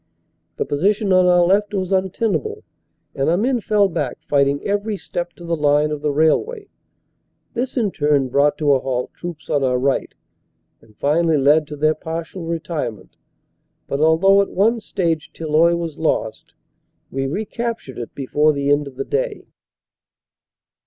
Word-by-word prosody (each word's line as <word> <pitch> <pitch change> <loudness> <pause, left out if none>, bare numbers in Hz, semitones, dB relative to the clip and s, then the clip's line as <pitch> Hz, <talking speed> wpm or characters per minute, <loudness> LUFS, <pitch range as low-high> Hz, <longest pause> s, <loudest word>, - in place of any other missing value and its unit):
The - - -2
position 195 +6 +1
on 185 0 +5
our 180 -1 +5
left 205 +3 +2
was 190 0 -1
un 190 0 +2
tenable 425 - -2 0.5
and 135 +2 0
our 170 - +2
men 245 +3 +1
fell 205 -1 +3
back 145 -8 -3
fighting 140 0 +2
every 205 +1 -1
step 175 -2 -5
to 175 - -12
the 170 0 0
line 150 0 +2
of 150 -1 -4
the 150 - 0
railway. 395 - +1 0.8
This 255 +3 -3
in 215 -5 +1
turn 145 -4 +1
brought 140 +3 +2
to 150 -2 +2
a 135 - +3
halt 125 -1 -3
troops 170 -3 -8
on 145 -2 +1
our 125 -1 +2
right 135 +2 -1 0.7
and 110 -2 -23
finally 160 +2 +2
led 145 +2 +4
to 150 - -7
their 155 +2 +2
partial 165 +3 -6
retirement, 150 - -4 0.7
but 140 - -3
although 170 +6 +5
at 200 - -2
one 225 +5 +2
stage 170 -7 -2
Tilloy 165 +2 +2
was 165 -2 -5
lost, 110 -8 -2 0.6
we 135 0 -2
recaptured 215 - -4
it 120 - -7
before 150 +3 +2
the 140 0 0
end 145 0 +2
of 135 - -10
the 135 - -4
day. - - -2
160 Hz, 165 wpm, -20 LUFS, 145-195 Hz, 0.8 s, on